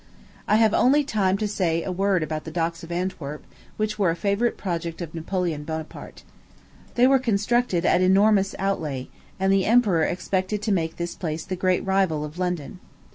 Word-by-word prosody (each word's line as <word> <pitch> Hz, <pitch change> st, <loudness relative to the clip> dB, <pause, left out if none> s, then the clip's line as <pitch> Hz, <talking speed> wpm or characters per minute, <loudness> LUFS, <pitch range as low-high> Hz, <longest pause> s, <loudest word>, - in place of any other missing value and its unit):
I 210 Hz, -, +4 dB
have 220 Hz, -1 st, +4 dB
only 285 Hz, +4 st, +4 dB
time 205 Hz, -8 st, +1 dB
left 195 Hz, -, -2 dB
to 215 Hz, -, +1 dB
say 170 Hz, -5 st, 0 dB
a 190 Hz, -, -3 dB
word 190 Hz, -1 st, +1 dB
about 155 Hz, 0 st, -4 dB
the -, -, -7 dB
docks 165 Hz, +1 st, -2 dB
of 165 Hz, -, -9 dB
Antwerp, 170 Hz, -5 st, -4 dB, 0.3 s
which 215 Hz, 0 st, -2 dB
were 190 Hz, -4 st, +3 dB
a 165 Hz, -, 0 dB
favorite 200 Hz, +6 st, 0 dB
project 170 Hz, -3 st, -4 dB
of 170 Hz, -3 st, -6 dB
Napoleon 170 Hz, -2 st, -2 dB
Bonaparte. 160 Hz, 0 st, -7 dB, 0.7 s
They 245 Hz, -, +5 dB
were 270 Hz, +1 st, +5 dB
constructed 220 Hz, -5 st, +1 dB
at -, -, +4 dB
an -, -, +1 dB
enormous 195 Hz, 0 st, +3 dB
outlay; 155 Hz, -9 st, -2 dB, 0.3 s
and 190 Hz, +1 st, +2 dB
the 195 Hz, -1 st, +2 dB
emperor 215 Hz, -7 st, +4 dB
expected 185 Hz, +3 st, -1 dB
to 215 Hz, -, 0 dB
make 165 Hz, -4 st, 0 dB
this 170 Hz, 0 st, -3 dB
place 160 Hz, -2 st, -4 dB
the 185 Hz, -, -3 dB
great 185 Hz, +1 st, 0 dB
rival 190 Hz, -6 st, +1 dB
of 150 Hz, +4 st, -9 dB
London. 180 Hz, -1 st, -3 dB
185 Hz, 190 wpm, -24 LUFS, 165-200 Hz, 0.7 s, They